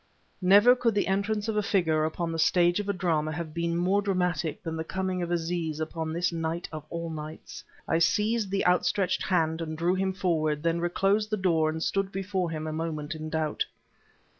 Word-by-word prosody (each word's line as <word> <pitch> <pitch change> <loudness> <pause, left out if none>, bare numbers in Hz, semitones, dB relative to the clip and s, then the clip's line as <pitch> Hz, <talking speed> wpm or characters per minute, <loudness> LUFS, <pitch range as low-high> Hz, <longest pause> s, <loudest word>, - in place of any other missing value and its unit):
Never 205 +7 +7
could 240 -3 +1
the 205 - +2
entrance 205 +2 0
of 220 - -1
a 210 - +2
figure 170 -7 +1
upon 165 +1 -2
the 165 - -3
stage 175 +2 +3
of 205 -1 -3
a - - +4
drama 165 -5 0
have 160 -1 -5
been 170 0 -1
more 185 +4 +2
dramatic 180 -5 -1
than 165 -1 -3
the 160 - -3
coming 185 +1 -2
of 170 - -3
Aziz 165 -2 -2
upon 160 0 -3
this 175 +2 0
night 165 +1 -3
of 155 -2 -6
all 170 -1 -4
nights. 155 0 -8 0.2
I 165 - +2
seized 210 +5 +2
the 195 +1 0
outstretched 180 +1 +2
hand 160 -3 +1
and 160 -1 -4
drew 170 +3 +2
him 190 0 0
forward, 155 -5 0
then 165 0 +1
reclosed 195 +5 +1
the 215 - 0
door 165 -5 +2
and 160 +1 -3
stood 195 0 0
before 190 -2 -2
him 155 -1 -4
a 155 - -3
moment 155 -1 -3
in 155 0 -6
doubt. 155 -1 -1
170 Hz, 205 wpm, -28 LUFS, 160-195 Hz, 0.2 s, Never